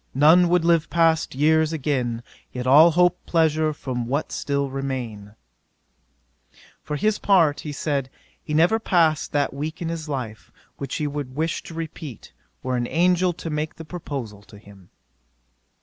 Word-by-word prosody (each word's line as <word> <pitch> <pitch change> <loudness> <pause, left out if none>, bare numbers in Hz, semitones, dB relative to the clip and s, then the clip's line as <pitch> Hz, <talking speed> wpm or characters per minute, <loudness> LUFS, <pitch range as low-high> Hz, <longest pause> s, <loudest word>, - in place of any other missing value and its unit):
none 165 +5 +6
would 175 -1 +2
live 165 -2 +3
past 165 -4 +2
years 160 +2 +3
again, 130 -6 -2 0.3
Yet 125 0 -5
all 150 +6 +7
hope 175 +2 +2
pleasure 160 -2 +2
from 125 -5 -4
what 140 +5 -2
still 140 -1 -1
remain." 120 -7 -5 1.5
For 150 - -4
his 215 +7 0
part, 170 -7 +3
he 150 - -6
said, 140 -2 -2 0.3
he 150 - -3
never 175 +8 +4
passed 165 -7 +2
that 145 -1 0
week 150 +3 -5
in 170 - -3
his 165 -2 -5
life 120 -6 -5 0.3
which 140 -2 -4
he 150 - -2
would 145 -3 -5
wish 160 +2 -1
to 165 - -11
repeat, 160 -6 -8 0.3
were 130 -1 -1
an 120 0 -1
angel 180 +2 +2
to 165 -1 -7
make 150 0 -3
the 160 - -10
proposal 140 - -6
to 105 +1 -16
him. 100 -3 -17
150 Hz, 160 wpm, -23 LUFS, 130-165 Hz, 1.5 s, all